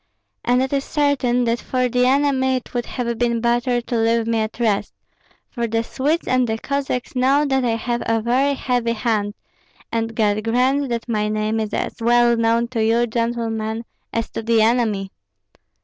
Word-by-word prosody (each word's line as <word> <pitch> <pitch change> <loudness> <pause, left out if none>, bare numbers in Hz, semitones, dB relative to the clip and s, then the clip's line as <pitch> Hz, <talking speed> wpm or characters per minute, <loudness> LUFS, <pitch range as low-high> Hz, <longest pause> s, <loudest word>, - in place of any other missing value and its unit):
And 250 +1 +2
it 265 - -3
is 275 -1 +1
certain 270 -5 +1
that 235 0 0
for 255 -1 0
the 250 +1 +2
enemy 265 -1 +2
it 255 - -6
would 240 -1 -2
have 235 -2 -3
been 235 -1 +1
better 240 +1 +1
to 240 - -4
leave 230 0 +2
me 230 0 0
at 220 +1 -3
rest; 210 -4 0 0.5
for 235 -3 -3
the 225 0 0
Swedes 290 +8 -1
and 255 -1 +2
the 220 - 0
Cossacks 275 0 -3
know 270 +4 +3
that 265 -2 +1
I 235 -2 +1
have 235 +1 -2
a 225 0 +2
very 260 +5 +1
heavy 245 -3 0
hand, 215 -3 -1 0.6
and 225 0 -2
God 210 -1 +1
grant 255 +4 +1
that 235 0 -3
my 210 -3 0
name 215 +1 -1
is 215 -1 -2
as - - -3
well 240 0 +4
known 230 +1 +2
to 230 -3 -1
you, 230 +2 +3
gentlemen, 230 -1 -2 0.3
as 230 0 -2
to - - -4
the 225 -1 +3
enemy." 220 -4 +1
235 Hz, 185 wpm, -21 LUFS, 225-255 Hz, 0.6 s, well